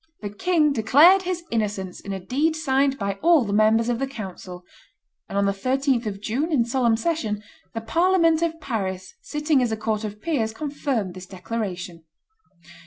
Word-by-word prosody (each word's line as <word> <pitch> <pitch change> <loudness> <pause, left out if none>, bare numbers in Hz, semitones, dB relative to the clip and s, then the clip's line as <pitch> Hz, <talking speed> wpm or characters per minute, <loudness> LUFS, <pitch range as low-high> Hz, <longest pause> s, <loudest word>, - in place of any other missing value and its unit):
The 205 -2 -5
king 305 - +2
declared 290 - +6
his 360 -2 -3
innocence 205 -5 -2
in 200 - -7
a 195 - -3
deed 285 - 0
signed 275 -3 +1
by 200 -4 -3
all 330 -6 +5
the 200 - -3
members 220 +2 +3
of 240 -1 0
the 270 - -1
council. 190 -7 -8 0.7
On 200 0 0
the 200 - +2
13th 255 +3 0
of 195 -1 -4
June, 260 +11 -2
in 250 -7 +2
solemn 235 -2 +2
session, 225 -7 -2 0.3
the 225 - -2
Parliament 335 +4 +3
of 330 -1 -1
Paris, 190 - -4
sitting 300 -2 0
as 240 -2 0
a 220 - -1
court 215 0 -2
of 210 -1 -6
peers, 225 -7 -1
confirmed 275 - -2
this 185 0 -10
declaration. 180 -4 -5
230 Hz, 175 wpm, -23 LUFS, 200-295 Hz, 0.7 s, declared